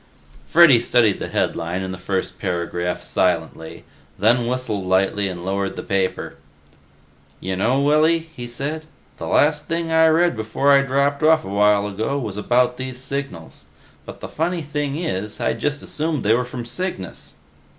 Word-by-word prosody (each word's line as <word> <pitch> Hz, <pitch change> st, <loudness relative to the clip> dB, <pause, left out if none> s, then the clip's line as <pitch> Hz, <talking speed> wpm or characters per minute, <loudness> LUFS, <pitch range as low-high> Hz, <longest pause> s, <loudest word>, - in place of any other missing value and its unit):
Freddy 155 Hz, -8 st, +7 dB
studied 115 Hz, -3 st, +2 dB
the -, -, -4 dB
headline 85 Hz, +3 st, -2 dB
and 95 Hz, 0 st, -4 dB
the -, -, -7 dB
first 95 Hz, -1 st, -3 dB
paragraph 90 Hz, -1 st, -2 dB
silently, 80 Hz, 0 st, -2 dB, 0.3 s
then 120 Hz, 0 st, +3 dB
whistled 120 Hz, -5 st, -2 dB
lightly 95 Hz, +2 st, +1 dB
and 90 Hz, -1 st, -7 dB
lowered 95 Hz, 0 st, -2 dB
the -, -, -6 dB
paper. 95 Hz, -1 st, -2 dB, 1.0 s
"Y'know, 95 Hz, +8 st, 0 dB
Willy," 160 Hz, +3 st, +2 dB
he 120 Hz, -1 st, -6 dB
said, 150 Hz, +6 st, -4 dB, 0.3 s
"the -, -, -6 dB
last 150 Hz, 0 st, +2 dB
thing 165 Hz, 0 st, -2 dB
I 160 Hz, 0 st, +5 dB
read 165 Hz, -1 st, +3 dB
before 110 Hz, +6 st, +1 dB
I 140 Hz, -1 st, +6 dB
dropped 140 Hz, +1 st, 0 dB
off 155 Hz, -3 st, +4 dB
a -, -, -6 dB
while 105 Hz, 0 st, +3 dB
ago 110 Hz, +7 st, -2 dB
was 110 Hz, -8 st, -4 dB
about 125 Hz, +4 st, +1 dB
these 130 Hz, -1 st, -5 dB
signals. 130 Hz, -10 st, -6 dB, 0.4 s
But -, -, -11 dB
the -, -, -5 dB
funny 170 Hz, +1 st, -2 dB
thing 145 Hz, -1 st, -3 dB
is, 105 Hz, -, -3 dB
I'd -, -, -1 dB
just 145 Hz, 0 st, -1 dB
assumed 155 Hz, -1 st, -2 dB
they 110 Hz, -, +4 dB
were 125 Hz, +2 st, +1 dB
from 125 Hz, -1 st, -7 dB
Cygnus." 120 Hz, -, -5 dB
125 Hz, 160 wpm, -21 LUFS, 100-150 Hz, 1.0 s, Freddy